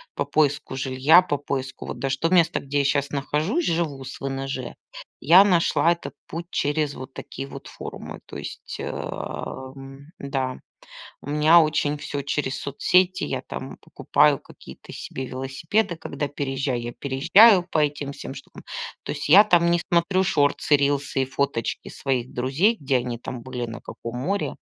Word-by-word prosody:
по -, -, -1 dB
поиску 145 Hz, -3 st, 0 dB
жилья, 135 Hz, +6 st, +5 dB
по 145 Hz, -5 st, -2 dB
поиску 130 Hz, -2 st, -4 dB
вот 120 Hz, -, -6 dB
даже 135 Hz, 0 st, -1 dB
то 165 Hz, -, 0 dB
место, 175 Hz, -3 st, +3 dB
где 145 Hz, +1 st, -2 dB
я -, -, +2 dB
щас 140 Hz, 0 st, +1 dB
нахожусь, 155 Hz, -, -1 dB
живу 160 Hz, -5 st, -1 dB
с 130 Hz, -, -8 dB
ВНЖ. 135 Hz, -1 st, -4 dB, 0.5 s
Я 175 Hz, +6 st, +8 dB
нашла 170 Hz, -4 st, +3 dB
этот 170 Hz, -, -9 dB
путь 170 Hz, +1 st, -6 dB
через 145 Hz, 0 st, -1 dB
вот 130 Hz, +1 st, -9 dB
такие 135 Hz, -, -7 dB
вот -, -, -10 dB
форумы. -, -, -8 dB
То -, -, -9 dB
есть, -, -, -7 dB
э, -, -, -4 dB
м, 135 Hz, +3 st, -7 dB
да, 135 Hz, -2 st, -3 dB, 0.6 s
у -, -, -11 dB
меня 155 Hz, +3 st, +6 dB
очень 150 Hz, -1 st, +1 dB
всё 145 Hz, -1 st, -4 dB
через 135 Hz, -1 st, -2 dB
соцсети. 180 Hz, +6 st, +2 dB
Я -, -, -3 dB
там -, -, -7 dB
покупаю -, -, +2 dB
какие-то -, -, -14 dB
себе 130 Hz, 0 st, -6 dB
велосипеды, 160 Hz, -, -1 dB
когда 145 Hz, -2 st, -4 dB
переезжаю. 135 Hz, -3 st, -2 dB
Я 120 Hz, 0 st, -5 dB
переезжаю 180 Hz, -, +5 dB
по 160 Hz, -, -1 dB
этим 145 Hz, -1 st, 0 dB
всем -, -, -8 dB
штукам. -, -, -12 dB, 0.4 s
То -, -, -6 dB
есть 145 Hz, -1 st, -5 dB
я 190 Hz, +7 st, +9 dB
там 170 Hz, -4 st, +4 dB
не 170 Hz, 0 st, +2 dB
смотрю 175 Hz, +2 st, +3 dB
шортсы, 145 Hz, -1 st, +2 dB
рилсы 140 Hz, -1 st, 0 dB
и 130 Hz, -, -1 dB
фоточки 130 Hz, -3 st, -2 dB
своих 130 Hz, -3 st, -2 dB
друзей, 140 Hz, -, +2 dB
где 135 Hz, -2 st, +1 dB
они 120 Hz, -1 st, -4 dB
там 120 Hz, -1 st, -7 dB
были, 125 Hz, -2 st, -4 dB
на 115 Hz, +1 st, -8 dB
каком 115 Hz, +1 st, -8 dB
море. 195 Hz, +10 st, -1 dB
140 Hz, 170 wpm, -24 LUFS, 135-165 Hz, 0.6 s, я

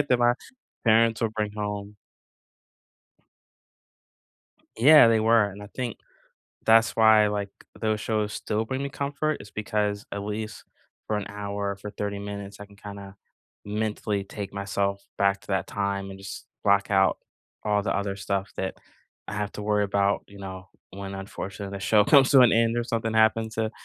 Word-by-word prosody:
right? 145 Hz, -, +1 dB
"That 125 Hz, -, +4 dB
my 120 Hz, 0 st, +4 dB, 0.5 s
parents 115 Hz, 0 st, +4 dB
will 115 Hz, -, +1 dB
bring 105 Hz, -1 st, -2 dB
home." 105 Hz, 0 st, -4 dB, 2.8 s
Yeah, 140 Hz, +1 st, +8 dB
they 110 Hz, -1 st, +3 dB
were, 115 Hz, -1 st, +5 dB
and 100 Hz, +1 st, -9 dB
I 105 Hz, -, -9 dB
think 125 Hz, -4 st, -4 dB, 0.7 s
that's 115 Hz, 0 st, +5 dB
why, 110 Hz, -1 st, +6 dB
like, 100 Hz, -1 st, -3 dB, 0.3 s
those 110 Hz, -1 st, 0 dB
shows 105 Hz, -1 st, -1 dB
still 110 Hz, +1 st, -2 dB
bring 130 Hz, +4 st, -3 dB
me 140 Hz, -, -2 dB
comfort 145 Hz, +2 st, -2 dB
is 100 Hz, -, -11 dB
because 105 Hz, -1 st, -2 dB
at 100 Hz, 0 st, -3 dB
least 105 Hz, +1 st, -5 dB, 0.4 s
for 110 Hz, -, 0 dB
an 105 Hz, -, -3 dB
hour, 100 Hz, 0 st, -3 dB
or -, -, -8 dB
for 105 Hz, +1 st, -8 dB
30 100 Hz, 0 st, -4 dB
minutes, 100 Hz, 0 st, -7 dB
I 105 Hz, -, -8 dB
can 100 Hz, 0 st, -19 dB
kinda, 100 Hz, -1 st, -10 dB, 0.5 s
mentally 105 Hz, -1 st, -2 dB
take 100 Hz, -1 st, -7 dB
myself 100 Hz, 0 st, -2 dB
back 100 Hz, 0 st, +2 dB
to -, -, -17 dB
that 95 Hz, -2 st, 0 dB
time 100 Hz, -1 st, -2 dB
and 95 Hz, -, -9 dB
just 95 Hz, 0 st, -8 dB, 0.2 s
block 100 Hz, 0 st, +3 dB
out 95 Hz, -1 st, +4 dB, 0.5 s
all 105 Hz, -1 st, +2 dB
the 95 Hz, -, -1 dB
other 100 Hz, -1 st, -2 dB
stuff 100 Hz, 0 st, -2 dB
that 95 Hz, -, -3 dB, 0.5 s
I 105 Hz, -, -4 dB
have 105 Hz, -1 st, -3 dB
to 105 Hz, -, -6 dB
worry 105 Hz, 0 st, +2 dB
about, 100 Hz, 0 st, +1 dB
you 100 Hz, -, -14 dB
know? 95 Hz, -1 st, -8 dB, 0.2 s
When, 100 Hz, 0 st, -7 dB
unfortunately 95 Hz, 0 st, -6 dB
the -, -, -7 dB
show 105 Hz, +1 st, +4 dB
comes 135 Hz, +3 st, +6 dB
to 135 Hz, -, +8 dB
an 120 Hz, -, +6 dB
end 115 Hz, 0 st, +3 dB
or 120 Hz, -, +1 dB
something 115 Hz, -1 st, -2 dB
happens 110 Hz, 0 st, +3 dB
to 110 Hz, 0 st, -1 dB
105 Hz, 180 wpm, -26 LUFS, 100-110 Hz, 2.8 s, Yeah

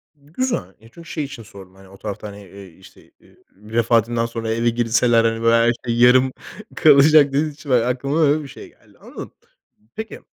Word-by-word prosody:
Güzel, 145 Hz, -, -4 dB
e, 115 Hz, -, -19 dB
çünkü 165 Hz, +7 st, -15 dB
şey 155 Hz, -, -4 dB
için 140 Hz, -5 st, -9 dB
sordum, 95 Hz, -3 st, -15 dB
hani, 95 Hz, 0 st, -18 dB
o 95 Hz, -, -16 dB
tarafta, 105 Hz, +1 st, -7 dB
hani, 100 Hz, 0 st, -11 dB
eee, 100 Hz, +1 st, -13 dB
işte, -, -, -19 dB
eee, -, -, -24 dB, 0.2 s
vefatından 115 Hz, +2 st, 0 dB
sonra 115 Hz, -1 st, -5 dB
eve 115 Hz, +1 st, 0 dB
girseler, 120 Hz, 0 st, +1 dB
hani, 115 Hz, 0 st, -1 dB
böyle 115 Hz, 0 st, +3 dB
her 115 Hz, +1 st, +3 dB
şey 115 Hz, -, -1 dB
yarım 130 Hz, +2 st, +5 dB, 0.4 s
kalacak 150 Hz, 0 st, +6 dB
dediğiniz 145 Hz, +2 st, -2 dB
için, 145 Hz, 0 st, -13 dB
eee, -, -, +5 dB
aklıma 135 Hz, +6 st, -1 dB
öyle 150 Hz, 0 st, +2 dB
bir -, -, -10 dB
şey -, -, -12 dB
geldi. -, -, -27 dB
Anladım. -, -, -11 dB, 0.6 s
Peki, 220 Hz, 0 st, -8 dB
120 Hz, 190 wpm, -20 LUFS, 115-140 Hz, 0.6 s, kalacak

